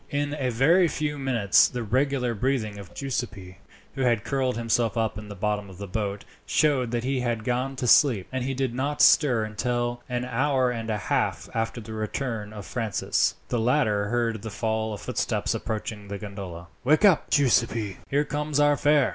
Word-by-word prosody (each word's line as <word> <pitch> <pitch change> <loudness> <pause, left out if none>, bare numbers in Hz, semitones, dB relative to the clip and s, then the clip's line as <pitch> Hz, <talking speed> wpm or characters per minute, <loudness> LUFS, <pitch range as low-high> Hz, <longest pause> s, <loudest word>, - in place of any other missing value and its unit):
In 145 0 -1
a 130 -2 0
very 160 +10 +4
few 150 -2 -3
minutes 115 -8 +4
the 120 -1 -4
regular 130 +2 0
breathing 110 -3 -1
of 95 -3 -11
Giuseppi, 100 -9 -5 0.3
who 135 - -4
had 120 -4 +2
curled 130 -3 -1
himself 115 0 0
up 110 -1 0
in 105 0 -8
the 100 - -7
bottom 105 0 -2
of 95 - -12
the 100 - -6
boat, 100 +1 -3 0.2
showed 140 -6 +2
that 120 0 -2
he 135 +1 0
had 120 -3 -1
gone 125 +3 -1
to 130 - -3
sleep; 120 -5 +5
and 130 -1 -2
he 135 +1 -2
did 130 -2 -1
not 140 +4 0
stir 125 -7 +5
until, 120 +2 -2
an 125 0 -2
hour 130 +1 +1
and 115 -2 -4
a 110 - 0
half 105 - -1
after 115 +1 -2
the 110 0 -8
return 110 0 -3
of 105 -3 -8
Francis, 115 -6 0
the 120 - 0
latter 110 -4 +2
heard 115 -1 -1
the 110 - -6
fall 110 0 -2
of 105 - -6
footsteps - - -1
approaching 105 -1 -4
the 100 0 -5
gondola. 95 -4 -7 0.2
"Wake 155 +10 +4
up, 190 -6 +4
Giuseppi, 115 -7 +2
here 145 +2 +1
comes 150 0 -2
our 145 0 +5
fare!" 145 -1 +3
120 Hz, 190 wpm, -26 LUFS, 105-135 Hz, 0.3 s, sleep